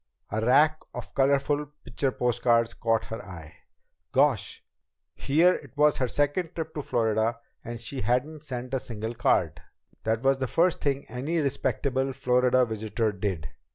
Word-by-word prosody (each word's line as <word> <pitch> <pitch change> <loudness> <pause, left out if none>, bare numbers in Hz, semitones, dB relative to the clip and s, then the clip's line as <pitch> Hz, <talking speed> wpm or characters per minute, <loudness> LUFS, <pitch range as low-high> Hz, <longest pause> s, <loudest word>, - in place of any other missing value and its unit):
A 110 +2 -1
rack 150 +6 +4 0.2
of - - -7
colorful 140 +2 +2 0.2
picture 135 -2 -1
post 120 -1 -1
cards 115 -1 +3
caught 115 -1 0
her 115 - -6
eye. 80 -4 -11 0.5
Gosh! - - +2 0.5
Here 165 +6 +3
it 145 0 -9
was 150 0 +4
her 130 - 0
second 145 +6 0
trip 160 -1 -4
to 150 - -3
Florida 115 -2 0 0.3
and 120 0 -6
she 125 +3 -4
hadn't 145 +5 -1
sent 125 -3 -6
a 135 - +1
single 115 -1 -5
card! - - +1 0.4
That 110 +2 0
was 135 0 +3
the 130 - -1
first 170 +7 +2
thing 140 -1 -1
any 140 +7 -3
respectable 135 -2 0
Florida 125 0 +3
visitor 110 0 -1
did! 95 - -3
125 Hz, 155 wpm, -27 LUFS, 115-145 Hz, 0.5 s, rack